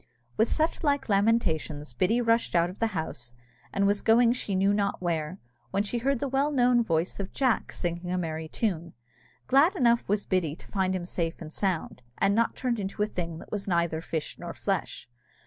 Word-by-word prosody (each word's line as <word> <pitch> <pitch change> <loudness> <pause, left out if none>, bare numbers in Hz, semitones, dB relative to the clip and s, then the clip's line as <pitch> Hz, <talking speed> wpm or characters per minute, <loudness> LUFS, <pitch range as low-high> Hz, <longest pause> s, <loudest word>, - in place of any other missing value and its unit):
With 220 - +3
such 315 +6 0
like 285 -5 +1
lamentations 170 - +1
Biddy 190 - +2
rushed 230 -4 +2
out 170 +1 +3
of 185 - -14
the 225 - +2
house, 120 -6 -5 0.4
and 200 0 +1
was 205 0 +2
going 235 +1 +5
she 210 -5 -3
knew 195 +2 +3
not 200 -1 0
where, 170 -1 -2 0.3
when 200 +10 0
she 235 +3 -2
heard 275 +3 +1
the 280 - -2
well 270 +2 +1
known 245 -4 +3
voice 165 -2 -1
of 200 -1 -4
Jack 255 -4 +1
singing 175 0 -3
a 185 - 0
merry 160 -2 -3
tune. 170 -3 -2 0.5
Glad 295 +9 +4
enough 235 -6 +3
was 205 0 +1
Biddy 175 -6 0
to - - -16
find 190 -2 +1
him 180 -2 -3
safe 165 -2 -2
and 155 -2 -9
sound, 185 -9 -2 0.2
and 195 0 +3
not 230 +2 +2
turned 245 -3 -1
into 200 +1 -2
a - - +3
thing 170 -6 -4
that - - -12
was 205 -2 -3
like 180 - +2
neither 170 -2 0
fish 160 -2 -4
nor - - -6
flesh. - - -3
195 Hz, 205 wpm, -28 LUFS, 170-230 Hz, 0.5 s, going